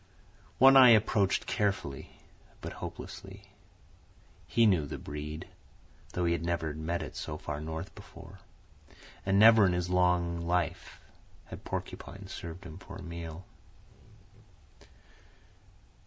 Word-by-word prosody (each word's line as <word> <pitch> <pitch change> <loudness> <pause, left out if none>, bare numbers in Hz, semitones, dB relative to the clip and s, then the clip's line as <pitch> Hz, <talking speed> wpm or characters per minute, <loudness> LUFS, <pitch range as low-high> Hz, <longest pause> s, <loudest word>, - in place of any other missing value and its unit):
One 135 +1 +8
Eye 130 -2 +10
approached 100 -2 +1
carefully 95 -10 -2 0.4
but - - -7
hopelessly. - - -9 1.0
He 115 +7 +3
knew 90 -9 +3
the - - -5
breed, 75 +1 -7 0.7
though 90 - 0
he 85 - +2
had 85 -1 -2
never 85 -3 -1
met 80 +3 -3
it - - -9
so 75 -1 -5
far 75 -1 -5
north 80 +4 -6
before; - - -13 0.9
and 95 0 +3
never 110 +1 +8
in 90 -2 +3
his 90 0 -2
long 90 -1 +2
life 85 0 -2 0.4
had - - -11
porcupine - - -6
served 85 +3 -8
him 85 0 -10
for 100 -2 -11
a 95 - -9
meal. 85 0 -7
85 Hz, 125 wpm, -30 LUFS, 80-95 Hz, 1.0 s, Eye